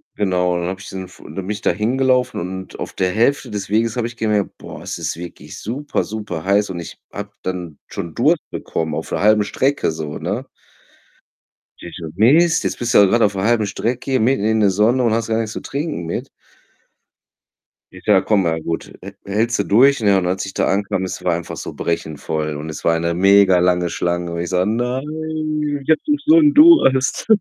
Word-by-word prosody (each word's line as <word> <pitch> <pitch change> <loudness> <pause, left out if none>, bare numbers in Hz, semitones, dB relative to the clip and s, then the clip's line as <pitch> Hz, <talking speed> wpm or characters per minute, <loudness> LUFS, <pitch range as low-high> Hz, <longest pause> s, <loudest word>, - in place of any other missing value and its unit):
genau. 90 -3 +1
Dann 85 0 -2
habe 95 0 -5
ich 100 - -10
diesen 95 -1 -6
F 90 - -17
dann - - -11
bin 95 0 -5
ich 105 0 -3
da - - +2
hingelaufen 125 +6 +1
und 95 +2 -7
auf - - -5
der 90 -1 0
Hälfte 120 +8 +1
des 100 -2 -5
Weges 115 +2 +1
habe 120 -1 0
ich 120 - -10
gemerkt: 105 -3 -1
„Boah, - - -10
es - - -5
ist - - -4
wirklich 85 0 -9
super, 135 +7 -3
super 105 -6 -6
heiß,“ 100 +1 +2
und 90 -2 -5
ich 85 - -9
habe 105 0 -7
dann 90 -4 -5
schon 85 -2 -6
Durst - - +1
bekommen 80 -2 -3
auf - - -5
der - - -2
halben 105 +1 +4
Strecke 135 - 0
so, 75 -1 -5
ne? - - -3 1.3
Ich 85 - -10
so: 85 -2 -6
„Mist, 160 - +4
jetzt - - -3
bist 120 -1 -1
du - - +7
halt 100 - +6
grad 120 +4 +2
auf 105 -2 +3
der 95 -1 -3
1/2 115 0 +2
Strecke 125 +6 -2
mitten 120 -2 +2
in 110 0 +2
der 100 - +4
Sonne 110 +7 +2
und 115 -2 +2
hast 115 0 -1
gar 110 - 0
nichts 110 -1 -2
zu - - -5
trinken 145 - -4
mit.“ 85 - -4 1.6
Ich - - -14
sage: - - +4
„Komm, 105 -3 +3
na 80 -2 0
gut, 80 +1 -5
hä - - -8
hältst 110 +4 0
du 100 - +2
durch.“ 130 +8 +4
Ja, 100 -3 +3
und 95 - 0
als 95 +2 -1
ich 95 - -8
da - - 0
ankam, 95 -1 0
es - - -6
war 90 -2 +2
einfach 85 0 -5
so - - -7
brechend 80 -3 -3
voll, 75 -1 -3
und 75 +2 -6
es 75 - -7
war 85 - +3
eine 85 +1 -1
mega 95 0 +5
lange 90 0 +2
Schlange 85 +1 -2
und 85 - -4
ich 85 - -3
so: 90 -1 +1
„Nein, 125 +5 -1 0.8
ich - - -12
habe 160 - +4
doch 295 -1 +2
so 315 +2 +6
'n 300 -3 +5
Durst.“ 295 - +5
100 Hz, 220 wpm, -19 LUFS, 90-120 Hz, 1.6 s, du